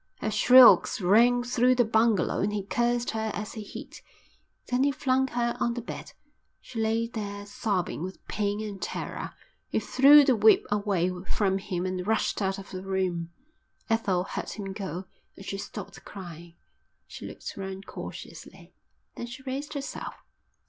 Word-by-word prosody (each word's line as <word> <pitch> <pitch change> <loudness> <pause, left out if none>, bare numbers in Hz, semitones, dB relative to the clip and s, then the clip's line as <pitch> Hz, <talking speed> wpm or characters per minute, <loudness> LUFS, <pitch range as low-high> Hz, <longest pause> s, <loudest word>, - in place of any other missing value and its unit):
Her 215 - -2
shrieks 250 +3 +7
rang 235 +6 +4
through 250 +1 +3
the 245 -1 +3
bungalow 220 -3 +2
and 200 +2 +1
he 205 -1 -2
cursed 240 +3 0
her 220 0 -2
as 210 +1 -5
he 220 - -6
hit. 205 - -9 0.6
Then 250 +1 +1
he 285 - +4
flung 265 -1 +1
her 235 -1 -1
on 235 0 0
the 240 - -3
bed. - - -8 0.5
She 235 - -8
lay 225 +1 +1
there 205 -3 -6
sobbing 200 -5 -2
with 185 +2 -7
pain 205 0 -1
and 205 -3 -7
terror. - - -5 0.4
He - - +1
threw 285 +2 +7
the 265 -3 +4
whip 215 0 +5
away 200 -4 +1 0.2
from 195 -2 +1
him 180 -2 -3
and 185 0 -3
rushed 220 -1 0
out 195 -1 0
of 195 - -10
the 185 - -5
room. 185 -3 -2 0.6
Ethel 195 -5 +1
heard - - -5
him 195 -3 -6
go 190 -2 -5 0.3
and 195 - -11
she 195 - -4
stopped 200 -1 -8
crying. 170 -3 -10 0.5
She - - -9
looked - - -8
round 195 0 -6
cautiously, - - -10 0.4
then 240 - -6
she 260 +3 -10
raised 275 +3 -5
herself. 280 -1 -5
210 Hz, 165 wpm, -27 LUFS, 195-240 Hz, 0.6 s, shrieks